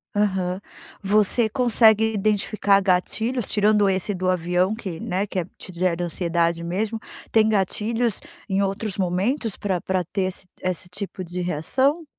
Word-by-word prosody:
Aham. 190 -3 0 0.4
Você 210 +3 +3
consegue 225 -3 +4
identificar 205 -1 +2
gatilhos, 220 +5 0
tirando 210 -1 +3
esse 190 +2 0
do 185 0 -1
avião 180 +3 +1
que, 185 -7 -6
né, 190 +3 -1
que 190 -2 -3
é 170 - -2
te 185 - -9
gera 175 0 0
ansiedade 170 0 0
mesmo, 210 +6 -2 0.3
tem 220 -1 +5
gatilhos, 220 +2 0 0.3
em 195 +1 +1
outros 195 +1 -2
momentos, 195 +6 0
pra 190 -3 -1
pra 185 0 -1
ter 190 +3 -2
ess 185 0 -4 0.2
esse 185 -1 -3
tipo 195 0 -6
de 180 +1 -5
reação? 260 - +1
195 Hz, 150 wpm, -23 LUFS, 180-215 Hz, 0.4 s, tem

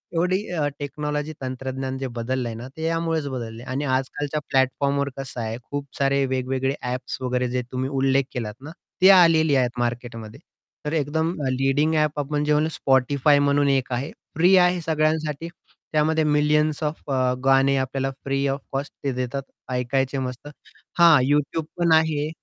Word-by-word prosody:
एवढी 185 +5 +1
अ, 150 -2 +1
टेक्नॉलॉजी, 150 +1 -3
तंत्रज्ञान 130 0 -4
जे 135 0 -3
बदललंय 120 0 -2
ना 120 +3 -7
ते 160 - -5
यामुळेच 165 -2 0
बदललंय 120 -2 -6
आणि 140 +3 -2
आजकालच्या 135 +3 -1
प्लॅटफॉर्मवर 140 +2 +1
कसं 130 -2 -6
आहे, 110 +1 -3
खूप 145 +2 -5
सारे 140 0 +2
वेगवेगळे 130 +1 -1
ॲप्स 125 +1 -4
वगैरे, 125 0 0
जे 125 0 -1
तुम्ही 130 +1 -2
उल्लेख 135 0 +2
केलात 110 -4 -4
ना, 155 - -8 0.3
ते 190 - +8
आलेली 165 -5 +5
आहेत 125 -1 0
मार्केटमध्ये. 120 -2 -4 0.5
तर 150 - -2
एकदम 160 +2 0 0.2
लीडिंग 135 +4 +1
ॲप 150 -1 +1
आपण 145 +1 -1
जे 150 - +2
म्हणलो 155 +2 +2
Spotify 140 +2 +3
म्हणून 145 0 +3
एक 130 -2 +1
आहे 135 +5 -3 0.2
फ्री 180 +4 +5
आहे 180 0 +4
सगळ्यांसाठी, 155 -1 0 0.4
त्यामध्ये 155 +1 +2
मिलियन्स 150 0 +2
ऑफ 150 +1 -3 0.4
गाणे 135 +1 +4
आपल्याला 135 +1 -1 0.2
फ्री 135 0 0
ओएफ 135 0 -1
कोस्ट 140 +1 -3
ते 140 - 0
देतात 130 +2 -3 0.3
ऐकायचे 130 +2 0
मस्त 125 +1 -5 0.5
हां, 165 -4 +8
YouTube 150 +2 +1
पण 170 -1 +2
आहे. 155 -1 +2
140 Hz, 160 wpm, -23 LUFS, 130-150 Hz, 0.5 s, ते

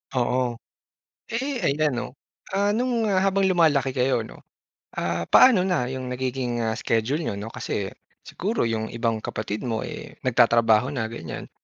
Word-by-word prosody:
Oo. 125 -1 +1 0.7
Eh, 260 +2 -2
ayan 150 0 +1
'no. 120 - -2 0.4
Ah, 200 +1 +1
no'ng 235 0 0
habang 195 +1 +2
lumalaki 155 -8 +3
kayo 125 -3 +1
'no, - - -12 0.5
ah, 85 0 -2
paano 200 -8 +6
na 130 -9 0
'yong 130 -1 -4
nagiging, 125 -2 -2
ah, 110 +1 -1
schedule 115 +7 0
n'yo - - -2
'no? 105 +3 -6
Kasi 100 -3 -3 0.3
siguro 210 +6 -2
'yong 110 -1 -1
ibang 115 -1 0
kapatid 110 +2 -4
mo, 110 -2 -1
eh, - - -7
nagtatrabaho 120 +1 +3
na 110 -3 -2
ganyan. 80 -9 -7
125 Hz, 150 wpm, -24 LUFS, 115-180 Hz, 0.7 s, paano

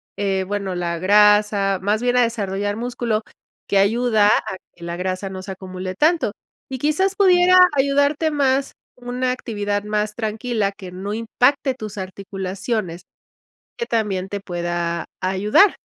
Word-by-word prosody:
eh, 195 -2 0
bueno, 200 -2 -3
la 170 -1 -2
grasa, 205 0 +4
más 210 +4 0
bien 245 0 +2
a - - +6
desarrollar 205 -3 -1
músculo 235 -1 -2 0.4
que 200 - +2
ayuda 220 +1 +3
a 190 -2 +1 0.2
que 170 - -14
la 170 0 -4
grasa 185 +2 -3
no 190 0 -6
se 190 - -7
acumule 185 0 -7
tanto 310 - +2 0.4
y 265 - -4
quizás 305 +8 +1
pudiera 365 -2 +5 0.2
ayudarte 285 +3 +2
más 275 -2 +1 0.2
una 250 +1 -2
actividad 205 -5 -2
más 210 0 -1
tranquila 220 -1 -1
que 195 -2 -11
no 190 +3 -5
impacte 250 +4 +1
tus 215 -3 -8
articulaciones, 190 0 -4 0.8
que 470 - -2
también 205 - -1
te 200 - -4
pueda 175 -2 -3 0.2
ayudar. 200 - +3
210 Hz, 145 wpm, -21 LUFS, 190-245 Hz, 0.8 s, a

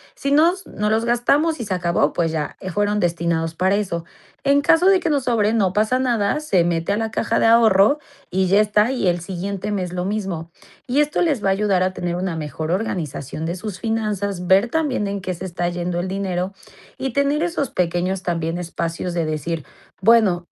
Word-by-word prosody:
si 280 - -3
nos 340 +6 +3
no 210 +1 -2
los 220 +1 +1
gastamos 280 +7 +2
y - - -4
se 195 - -2
acabó, 170 -5 +1
pues 165 -2 0
ya, 155 -2 -3
eh, 185 - -5
fueron 205 +3 0
destinados 170 -2 -1
para 185 +3 +2
eso. 175 -5 -2 0.4
En 280 +1 +4
caso 325 +5 +4
de 385 -1 +5
que 340 - -1
nos 285 -3 +1
sobre, 225 -3 +2
no 195 -5 +1
pasa 215 +5 +2
nada, 240 -2 +1
se 195 - +2
mete 170 +1 -1
a - - 0
la 225 0 -1
caja - - 0
de - - +3
ahorro 225 +2 +5 0.3
y 190 +1 +1
ya 195 +3 +5
está, 210 +2 +2
y 245 -7 -1
el 175 -1 +1
siguiente 195 +3 -4
mes 185 -3 -2
lo 180 0 -2
mismo". 190 -5 -3 0.4
Y 260 +3 +1
esto 295 0 0
les 300 -10 +1
va 195 - +2
a - - +4
ayudar 195 -2 +1
a 185 0 0
tener 175 -1 -3
una 180 -2 -2
mejor 155 0 -4
organización 160 - -3
de 170 +2 -2
sus 185 0 -6
finanzas, 200 -4 -2
ver 195 +5 +5
también 275 -7 0
en 200 0 -3
qué 185 0 -3
se 180 +2 -7
está 175 -1 -2
yendo 175 0 -3
el 185 - -4
dinero 190 -1 -2 0.4
y 265 -2 -3
tener 280 +3 +1
esos 340 -5 -1
pequeños 180 +2 -1
también 165 -1 -2
espacios 170 0 -4
de 170 -2 0
decir: 155 0 -3 0.4
"Bueno, 195 -5 +4
195 Hz, 210 wpm, -21 LUFS, 175-225 Hz, 0.4 s, de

